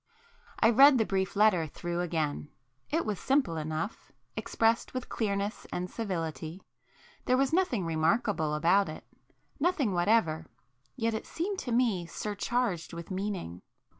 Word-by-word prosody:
I 225 Hz, -, +5 dB
read 275 Hz, +3 st, +8 dB
the 220 Hz, -, +2 dB
brief 190 Hz, -1 st, -1 dB
letter 200 Hz, -6 st, +4 dB
through 175 Hz, +3 st, -3 dB
again,—it 150 Hz, -, -3 dB
was 210 Hz, -3 st, -2 dB
simple 265 Hz, -, +1 dB
enough,—expressed 165 Hz, +9 st, -2 dB
with 255 Hz, -, -4 dB
clearness 200 Hz, -1 st, -2 dB
and 180 Hz, 0 st, -3 dB
civility. 170 Hz, -4 st, -4 dB, 0.6 s
There 255 Hz, -, +3 dB
was 275 Hz, +2 st, +1 dB
nothing 290 Hz, -, +1 dB
remarkable 160 Hz, 0 st, +1 dB
about 175 Hz, +4 st, +3 dB
it,—nothing 285 Hz, -, -3 dB
whatever; 175 Hz, -4 st, +2 dB, 0.5 s
yet 230 Hz, -3 st, 0 dB
it 220 Hz, -, -4 dB
[p -, -, -15 dB
16] -, -, -16 dB
seemed 375 Hz, +4 st, -1 dB
to 245 Hz, -, -4 dB
me 230 Hz, -8 st, +1 dB
surcharged 205 Hz, -1 st, -2 dB
with 170 Hz, +2 st, -7 dB
meaning. 185 Hz, -, -4 dB
200 Hz, 135 wpm, -30 LUFS, 165-235 Hz, 0.6 s, read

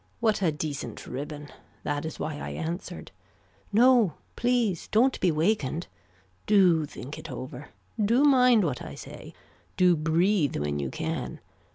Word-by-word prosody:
What 220 Hz, -3 st, +1 dB
a 175 Hz, -4 st, +3 dB
decent 145 Hz, -6 st, -5 dB
ribbon. 145 Hz, +2 st, -6 dB, 0.3 s
That 145 Hz, +1 st, -2 dB
is 160 Hz, -, -6 dB
why 150 Hz, -2 st, -4 dB
I -, -, -5 dB
answered. 175 Hz, +2 st, -5 dB, 0.6 s
No 235 Hz, -3 st, +5 dB, 0.2 s
please 240 Hz, -7 st, 0 dB
don't 250 Hz, +5 st, +2 dB
be 185 Hz, -, +3 dB
wakened. 160 Hz, -1 st, 0 dB, 0.6 s
Do 180 Hz, -7 st, +4 dB
think 140 Hz, +1 st, -8 dB
it 165 Hz, -, -9 dB
over. 130 Hz, +2 st, -7 dB, 0.3 s
Do 235 Hz, +7 st, +3 dB
mind 250 Hz, -6 st, +5 dB
what 145 Hz, -8 st, -2 dB
I -, -, -8 dB
say. -, -, -10 dB, 0.4 s
Do 180 Hz, -1 st, +5 dB
breathe 165 Hz, +1 st, +1 dB
when 75 Hz, 0 st, -2 dB
you 70 Hz, -2 st, -2 dB
can. -, -, -4 dB
165 Hz, 145 wpm, -27 LUFS, 145-215 Hz, 0.6 s, No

